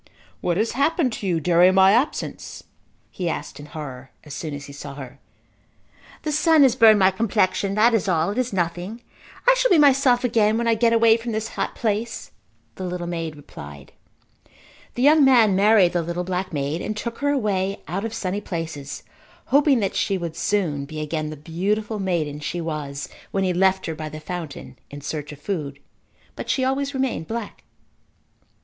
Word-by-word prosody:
"What 175 -1 -1
has 220 +3 +1
happened 280 -1 +1
to 200 - -4
you 170 -3 +1
during 175 +3 +4
my 190 0 +6
absence" 245 +8 -1 0.5
he 180 -2 -3
asked - - -5
in 145 - -10
horror 135 -4 -8
as 150 - -10
soon 155 -2 -5
as 145 0 -8
he 140 - -11
saw 140 0 -8
her. 135 -3 -10 1.0
"The 305 - -2
sun 305 0 +4
has 255 -3 +4
burned 225 -3 +7
my 190 -1 +4
complexion. 195 -1 0
That 230 +3 +4
is 220 -3 +1
all. 170 0 +1
It 220 - -2
is 255 -1 -1
nothing. 180 +5 -3 0.4
I - - +8
shall - - +2
be 360 - +5
myself 270 -4 +4
again 220 -3 +2
when 235 0 -1
I 230 - +4
get 230 +1 +2
away 230 -1 +5
from 230 0 -5
this 220 +1 -2
hot - - -3
place," 225 +1 -2 0.5
the 190 - -5
little 180 -1 -4
maid 165 -2 -4
replied. 70 - -11 1.0
The 245 - -1
young 300 +1 +6
man 235 -7 +5
married 200 -2 +5
the 175 - +1
little 170 +2 -3
black 185 +1 -3
maid 145 +2 -2
and 215 - -4
took 230 +1 -5
her 285 0 0
away 200 -7 -1
out 185 +5 -3
of 225 - -3
sunny 195 -1 -3
places 160 -7 -6 0.5
hoping 280 -4 +4
that 195 -1 -1
she 195 - 0
would 170 -3 -5
soon 170 -7 -1
be 155 +2 -7
again 155 0 -3
the 155 - -7
beautiful 205 +8 -2
maiden 165 -6 -1
she 150 +3 -4
was 150 -4 -4 0.2
when 195 - -1
he 185 -1 +1
left 190 +1 +2
her 165 - -3
by 155 0 -6
the 155 +1 -8
fountain 155 -5 -7
in 145 0 -9
search 150 +1 -5
of 145 - -11
food. 145 -5 -4 0.6
But - - -7
she 260 - +1
always 275 +1 -1
remained 260 -11 -2
black. 230 -2 -6
190 Hz, 190 wpm, -23 LUFS, 160-230 Hz, 1.0 s, I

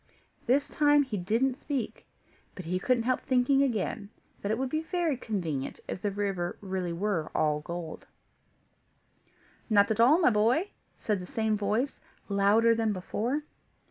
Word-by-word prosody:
This 275 +4 +3
time 290 -1 +4
he 260 -6 -5
didn't 230 +8 0
speak, 270 -7 -4 0.5
but 185 - -8
he 180 +2 -1
couldn't 245 +3 +1
help 255 +2 0
thinking 260 +2 +3
again 220 -5 -1 0.3
that 200 - -2
it 220 - +1
would 265 +1 -1
be 310 - 0
very 330 -2 -1
convenient 170 - -3
if 185 - -5
the 205 - 0
river 195 -3 -2
were 200 - -12
really 185 -2 -2 0.4
all 150 -1 +2
gold. 170 +1 -7 1.6
"Not 205 -1 +4
at 220 - -1
all, 255 +7 +6
my 330 -8 +4
boy," 240 - +2 0.3
said 210 -3 -1
the 180 - -8
same 220 -1 +1
voice, 210 +6 -1 0.3
louder 205 +3 +4
than 225 -2 0
before. 235 +9 -2
220 Hz, 155 wpm, -29 LUFS, 195-260 Hz, 1.6 s, all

